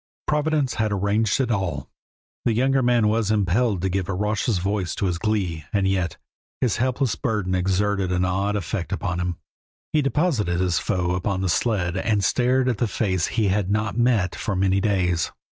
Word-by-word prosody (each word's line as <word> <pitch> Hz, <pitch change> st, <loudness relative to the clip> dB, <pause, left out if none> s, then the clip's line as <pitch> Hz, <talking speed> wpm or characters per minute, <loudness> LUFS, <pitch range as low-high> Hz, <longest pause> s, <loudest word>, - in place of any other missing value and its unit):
Providence 150 Hz, -2 st, +1 dB
had 110 Hz, -1 st, 0 dB
arranged 100 Hz, +4 st, +1 dB
it 125 Hz, -3 st, +1 dB
all. 90 Hz, -, -2 dB, 0.6 s
The 115 Hz, -, +2 dB
younger 135 Hz, +4 st, +2 dB
man 120 Hz, -3 st, +3 dB
was 110 Hz, -1 st, +1 dB
impelled 105 Hz, -1 st, +1 dB
to 95 Hz, -, +1 dB
give 95 Hz, 0 st, -2 dB
raucous 105 Hz, +2 st, 0 dB
voice 95 Hz, 0 st, -1 dB
to 100 Hz, -, -1 dB
his 90 Hz, -3 st, -1 dB
glee, 95 Hz, -8 st, -1 dB
and 100 Hz, -2 st, +1 dB
yet 90 Hz, -4 st, -1 dB, 0.4 s
his 125 Hz, -6 st, +1 dB
helpless 125 Hz, -1 st, 0 dB
burden 105 Hz, -8 st, -1 dB
exerted 95 Hz, +1 st, 0 dB
an 90 Hz, 0 st, +1 dB
odd 100 Hz, +3 st, 0 dB
effect 100 Hz, -1 st, -3 dB
upon 95 Hz, -2 st, -2 dB
him. 90 Hz, -1 st, -2 dB, 0.6 s
He 155 Hz, -, +4 dB
deposited 135 Hz, -, 0 dB
his 90 Hz, -3 st, +1 dB
foe 90 Hz, -1 st, -1 dB
upon 95 Hz, +1 st, -1 dB
the 95 Hz, -, 0 dB
sled 95 Hz, -3 st, 0 dB
and 100 Hz, 0 st, +1 dB
stared 125 Hz, +5 st, +2 dB
at 120 Hz, -5 st, 0 dB
the 120 Hz, -, +2 dB
face 95 Hz, -4 st, 0 dB
he 110 Hz, -4 st, 0 dB
had 95 Hz, -1 st, 0 dB
not 105 Hz, +1 st, 0 dB
met 115 Hz, -6 st, +2 dB
for 100 Hz, -, -3 dB
many 95 Hz, +1 st, +2 dB
days. 90 Hz, -5 st, +1 dB
100 Hz, 180 wpm, -23 LUFS, 90-115 Hz, 0.6 s, He